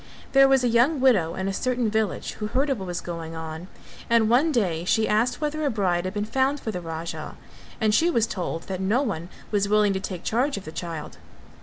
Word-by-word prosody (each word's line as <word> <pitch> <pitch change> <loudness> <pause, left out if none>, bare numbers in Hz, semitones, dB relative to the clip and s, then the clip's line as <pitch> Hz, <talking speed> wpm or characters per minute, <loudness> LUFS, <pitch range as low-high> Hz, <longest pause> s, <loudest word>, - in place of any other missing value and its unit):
There 275 0 +7
was 270 -1 +4
a - - +3
young 245 +6 +3
widow 205 -11 +3
in 190 0 -2
a 195 - -1
certain 250 +2 0
village 220 -3 -1
who 210 - -1
heard 270 +6 0
of 260 - -1
what 190 - -6
was 175 0 -3
going 165 -1 -6
on, 160 +2 -6 0.4
and 230 -1 +4
one 285 +7 +4
day 180 - 0
she 220 +4 +2
asked 235 +4 +1
whether 305 0 -2
a 290 - +2
bride 185 -6 0
had 185 - -3
been 205 0 -1
found 265 +5 +1
for 220 - -4
the 180 -3 -5
Raja 165 0 -6 0.4
and 215 -2 +2
she 330 +10 +4
was 230 -9 +2
told 175 -5 -4
that 190 -1 -5
no 215 +8 +2
one 180 - -3 0.2
was 205 -1 +1
willing 210 -1 +4
to 190 - -1
take 190 -2 -6
charge 260 +5 0
of 200 - -7
the 155 - -7
child. 165 -2 -6
210 Hz, 230 wpm, -25 LUFS, 180-250 Hz, 0.4 s, There